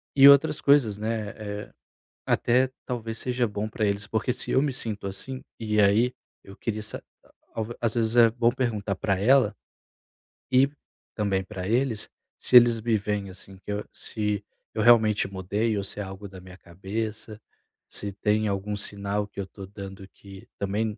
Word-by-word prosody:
e 140 0 +9
outras 140 +2 +5
coisas, 135 -8 +4
né, 110 0 -2
eh, 105 -1 -7 0.5
até 125 +2 +2 0.2
talvez 115 -3 -4
seja 125 -1 0
bom 105 +1 -3
para 110 0 -2
eles, 100 0 0
porque 110 +4 0
se - - -3
eu 130 - +4
me 145 -2 0
sinto 110 -6 -4
assim 130 +7 -5 0.2
E 105 -2 +1
aí, 110 +5 +4 0.3
eu 100 - -12
queria 110 -2 -3
sa 110 - -5 0.8
às 115 -2 0
vezes 115 -1 +1
é 115 -1 +7
bom 115 +1 +2
perguntar 110 -6 -1
para 95 0 0
ela 110 0 +4 1.0
e 130 +2 +5 0.5
também 100 -3 0
para 95 -2 -6
eles 120 0 +2 0.3
se - - +1
eles 120 -2 +8
me 115 0 +1
veem 105 -1 -3
assim, 95 +1 -12
que 105 - -7
eu 105 0 -2
se 105 -2 -3 0.3
eu 110 - -1
realmente 110 -4 +5
mudei 100 +4 -1
ou 100 - -2
se 100 - -5
é - - -2
algo 95 +1 -8
da 95 0 -11
minha 90 0 -13
cabeça, 105 +4 -5 0.5
se 100 -1 -2
tem 105 +2 +1
algum 100 +1 -2
sinal 100 0 -2
que 100 - -11
eu - - -4
estou 95 0 -11
dando 95 -1 -9
que 95 -1 -14
também 105 +2 -1
105 Hz, 175 wpm, -26 LUFS, 100-115 Hz, 1.0 s, e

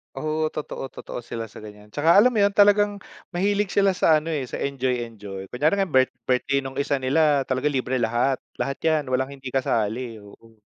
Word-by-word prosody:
Oo. 155 +3 -1
Totoo, 150 -3 -6
totoo - - -8
sila 115 -1 -6
sa - - -11
ganiyan. 105 0 -13
Tsaka 160 +3 +3
alam 235 +6 +6
mo 220 - 0
'yon, 200 0 +3
talagang 205 0 +5 0.4
mahilig 200 +2 +1
sila 200 -1 +4
sa 165 -3 +3
ano, 165 +1 -5
eh, 140 -5 -2
sa - - -6
enjoy-enjoy. 115 -8 -3
Kunyari 150 +9 +2
ngayon 195 -5 -1
birth 130 0 +3
birthday 135 +3 +1
nung 135 0 -7
isa 140 0 +1
nila, 145 +1 +3
talaga 130 +2 -1
libre 130 -2 -1
lahat. 120 +3 +1 0.2
Lahat 140 0 -3
'yan, 155 -4 0
walang 130 +2 -1
hindi 135 -2 -8
kasali, 120 -2 -1
oo. 110 +2 -17
135 Hz, 190 wpm, -24 LUFS, 125-160 Hz, 0.4 s, alam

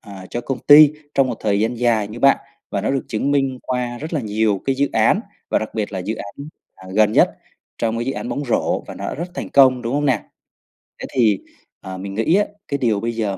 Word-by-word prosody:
ờ, 100 -3 -11
cho 120 - -3
công 130 +2 -4
ty 150 0 +8 0.2
trong 135 - +4
một 120 - -3
thời 100 -1 +1
gian 115 +3 0
dài 115 -4 +1
như 110 +3 -8
bạn 140 0 +6 0.3
và - - -1
nó - - -1
được 135 -1 -1
chứng 110 +6 -1
minh 135 -2 +1
qua 125 -1 -3
rất 155 +5 -7
là 155 - 0
nhiều 105 -3 0
cái 135 - +1
dự 140 +1 +1
án - - +3 0.3
và - - +2
đặc 110 - -6
biệt 105 -2 -2
là 95 - -3
dự 100 +5 -3
án, 110 +8 -8 0.3
ờ, 95 0 -13
gần 110 0 +4
nhất - - +5 0.5
trong 115 0 -1
cái 120 - -2
dự 135 - 0
án - - -5
bóng 145 - -3
rổ, 120 - 0
và - - -8
nó - - -7
đã - - -4
rất 170 +4 -5
thành - - -5
công, 130 -2 +5
đúng 120 +2 -2
hông 145 +1 +1
nè? 125 -6 +1 0.8
Thế - - -5
thì, 110 -6 +3 0.4
ờ, 95 0 -7
mình 95 +1 -6
nghĩ 115 - +2
á 205 +1 +3 0.2
cái 140 - -1
điều 115 -6 +1
bây 115 +2 -2
giờ 105 -4 -2
120 Hz, 255 wpm, -20 LUFS, 105-135 Hz, 0.8 s, ty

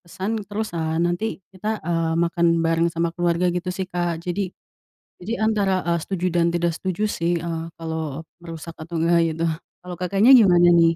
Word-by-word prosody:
pesan 195 +5 -4
terus, 210 0 -3
eee, 160 -1 -2
nanti 175 +5 0 0.3
kita, 210 +3 -3
eee, 165 -1 0
makan 170 0 +2 0.2
bareng 165 +1 +2
sama 170 0 -1
keluarga 175 +1 +1
gitu 180 +1 -3
sih 190 - -2
Kak. 175 -2 -2
Jadi 185 +2 -2 0.8
jadi 225 +6 -3
antara, 200 -4 +1
eee, 170 0 +2
setuju 185 -2 -2
dan 170 -1 +3
tidak 170 0 0
setuju 190 +4 -2
sih, 170 -3 0
eee, 165 -1 -4
kalau 160 -3 -4 0.2
merusak 165 0 -8
atau 165 +2 -6
enggaknya 170 +1 +3
gitu. 160 +1 -3 0.4
Kalau 180 0 -8
Kakaknya 195 +7 +3
gimana 180 -7 +6
nih? 165 -1 +5
175 Hz, 175 wpm, -23 LUFS, 165-185 Hz, 0.8 s, gimana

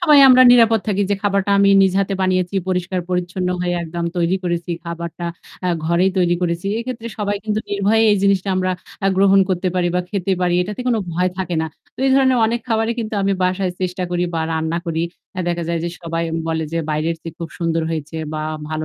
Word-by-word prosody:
সবাই 305 -5 +6
আমরা 255 0 +8
নিরাপদ 230 -2 +5
থাকি 205 -1 +1
যে - - +3
খাবারটা 200 -1 +1
আমি 200 0 +5
নিজে 190 -1 +2
হাতে 195 0 -1
বানিয়েছি। 185 0 0
পরিষ্কার-পরিচ্ছন্ন 180 0 -2
হয়ে 175 0 0
একদম 170 +1 -4
তৈরি 175 +2 +2
করেছি 175 -1 -2
খাবারটা, 170 0 -5 0.4
অ্যা 180 - 0 0.2
ঘরেই 175 +3 +3
তৈরি 175 -1 +3
করেছি। 170 +2 -1
এক্ষেত্রে 235 -1 -5
সবাই 205 -1 -1
কিন্তু 215 0 -1
নির্ভয়ে 205 +2 +2
এই 205 - +4
জিনিসটা 195 -1 +2
আমরা 185 0 0 0.3
আ - - +4
গ্রহণ 195 0 +5
করতে 185 0 0
পারি 180 -1 +1
বা 180 - +2
খেতে 195 -1 -1
পারি, 175 -1 +2
এটাতে 210 +5 -5
কোন 240 - +2 0.2
ভয় 180 +2 +1
থাকে 180 -2 -2
না। - - -1 0.3
তো - - -49
এই - - +3
ধরনের 260 -2 +4
অনেক 235 +2 -1
খাবরি 225 0 +1
কিন্তু 220 -2 -3
আমি 195 0 +2
বাসায় 185 0 0
চেষ্টা 185 0 -2
করি 175 0 0
বা 165 - 0
রান্না 160 +1 -1
করি। 165 0 -1 0.3
অ্যা 185 - -2
দেখা 175 0 -1
যায় 170 0 0
যে - - -1
সবাই 165 0 -2 0.3
বলে 160 0 -1
যে 165 - 0
বাইরের 155 +2 -1
চেয়ে - - -6
খুব 170 - -5
সুন্দর 165 -1 0
হয়েছে 155 0 -4 0.2
বা 155 - -3 0.3
ভালো 155 0 -3
185 Hz, 210 wpm, -19 LUFS, 170-200 Hz, 0.4 s, আমরা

